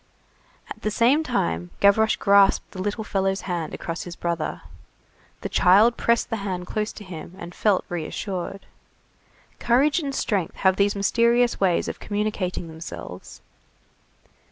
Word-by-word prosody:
At -, -, -9 dB
the 215 Hz, -, -1 dB
same 240 Hz, +8 st, +3 dB
time 85 Hz, -, -1 dB
Gavroche 220 Hz, +2 st, +4 dB
grasped 200 Hz, -1 st, +4 dB
the 185 Hz, -, -6 dB
little 205 Hz, +3 st, -2 dB
fellow's 195 Hz, -2 st, -1 dB
hand 175 Hz, -4 st, -3 dB
across 165 Hz, 0 st, -5 dB
his 175 Hz, -1 st, -7 dB
brother. 170 Hz, -2 st, -3 dB, 0.8 s
The -, -, -3 dB
child 210 Hz, +6 st, +5 dB
pressed 235 Hz, 0 st, +1 dB
the 225 Hz, -, 0 dB
hand 185 Hz, -3 st, -4 dB
close 210 Hz, +3 st, -2 dB
to 210 Hz, -, -10 dB
him, 175 Hz, -2 st, -9 dB
and 175 Hz, -1 st, -9 dB
felt 205 Hz, -2 st, +1 dB
reassured. 180 Hz, +3 st, -5 dB, 0.9 s
Courage 275 Hz, +8 st, +3 dB
and 280 Hz, -4 st, -4 dB
strength 195 Hz, -9 st, -1 dB
have 190 Hz, -1 st, +2 dB
these 200 Hz, +1 st, +2 dB
mysterious 235 Hz, +4 st, +2 dB
ways 185 Hz, -3 st, +2 dB
of -, -, -5 dB
communicating 205 Hz, -4 st, -2 dB
themselves. 90 Hz, -, -9 dB
195 Hz, 140 wpm, -24 LUFS, 175-220 Hz, 0.9 s, child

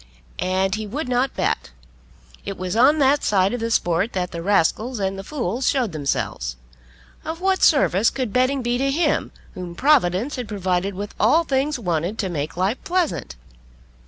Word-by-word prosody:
And 190 Hz, +1 st, 0 dB
he 215 Hz, 0 st, -3 dB
would 280 Hz, +7 st, -4 dB
not 250 Hz, +2 st, 0 dB
bet. -, -, -1 dB, 0.7 s
It 195 Hz, -1 st, -5 dB
was 185 Hz, +1 st, -3 dB
on 265 Hz, +7 st, +5 dB
that 280 Hz, 0 st, +3 dB
side 195 Hz, +1 st, +2 dB
of 245 Hz, -, -2 dB
the 230 Hz, 0 st, -2 dB
sport 180 Hz, 0 st, +1 dB
that 180 Hz, -2 st, -2 dB
the 170 Hz, -, -5 dB
rascals 205 Hz, +6 st, +1 dB
and 195 Hz, -1 st, -1 dB
the 195 Hz, -, -7 dB
fools 250 Hz, -2 st, -2 dB
showed 250 Hz, -7 st, 0 dB
themselves. 140 Hz, -, -2 dB, 0.7 s
Of 325 Hz, +1 st, -5 dB
what 380 Hz, 0 st, +1 dB
service 230 Hz, -, +4 dB
could 255 Hz, -6 st, -4 dB
betting 255 Hz, +1 st, +2 dB
be 240 Hz, +1 st, 0 dB
to 275 Hz, +1 st, +1 dB
him 320 Hz, +5 st, +1 dB, 0.2 s
whom 180 Hz, -2 st, -7 dB
Providence 255 Hz, -, +2 dB
had 245 Hz, -3 st, -4 dB
provided 190 Hz, -1 st, -1 dB
with 200 Hz, +2 st, -6 dB
all 300 Hz, +11 st, +4 dB
things 280 Hz, 0 st, 0 dB
wanted 175 Hz, -1 st, -2 dB
to 195 Hz, -4 st, -2 dB
make 155 Hz, -1 st, -4 dB
life 195 Hz, +7 st, -1 dB
pleasant? 355 Hz, -, -1 dB
220 Hz, 175 wpm, -22 LUFS, 185-270 Hz, 0.7 s, on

